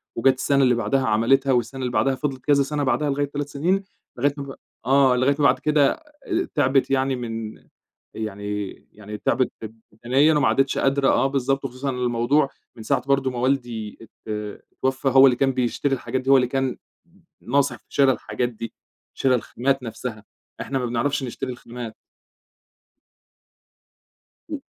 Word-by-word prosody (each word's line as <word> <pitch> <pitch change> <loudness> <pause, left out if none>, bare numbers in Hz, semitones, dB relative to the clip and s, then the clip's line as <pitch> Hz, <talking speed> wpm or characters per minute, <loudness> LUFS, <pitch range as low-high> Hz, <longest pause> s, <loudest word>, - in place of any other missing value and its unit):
وجات 130 +3 +4
السَّنة 140 +1 +2
اللي 125 -2 +4
بَعدها 120 +4 0
عملِتها 135 +6 +3
والسَّنة 125 +1 0
اللي 125 -1 -2
بَعدها 135 +2 +2
فضِلِت 135 -2 -4
كذا 145 -1 +4
سَنَة 145 +1 -2
بَعدها 135 +3 +1
لغاية 145 +1 0
3 145 0 -4
سنين، 180 +8 0 0.3
لغاية 145 +3 +1
ما 140 - -4
ب 135 -1 -8 0.3
آه، 135 0 +4
لغاية 130 +3 +2
ما 145 - +3
بعد 130 -1 +4
كده 150 -2 +3
آآ 315 +4 -4
تعِبِت 135 +1 +2
يعني 135 0 +1
من 115 -3 -5 0.6
يعني 105 -1 -4 0.2
يعني 105 0 -9
تعِبِت 130 +4 +1 0.4
بدنيًا 135 +8 +3
وما 145 - +3
عادتش 135 0 +1
قادرة، 135 0 +2
آه 135 - +3
بالضبط، 135 0 0
وخصوصًا 135 +1 -3
الموضوع 125 +3 +1 0.3
من 115 - -9
ساعة 125 +2 0
برضه 135 -1 +2
ما 125 - -6
والدي 120 -4 -2
ات 115 - -14 0.6
اتوفّى، 130 +1 -1
هو 135 +1 +7
اللي 125 - +4
كان 135 +1 +2
بيشتري 130 +2 0
الحاجات 130 0 -3
دي، 130 - -2
هو 135 - +8
اللي 125 -2 +2
كان 135 -1 -1 0.7
ن - - -11
ناصح 140 -3 +2
في - - -26
شِرَى 135 -2 +4
الحاجات 125 0 -2
دي، 115 -1 -7 0.4
شِرَى 130 -1 +2
الخامات 130 +3 -1
نفْسها، 115 -1 -6 0.4
إحنا 135 - -2
ما 125 - -2
بنعرَفش 120 +4 -1
نشتري 130 +1 -5
الخامات. 120 -2 -8 2.6
و - - -1
130 Hz, 170 wpm, -23 LUFS, 120-140 Hz, 2.6 s, هو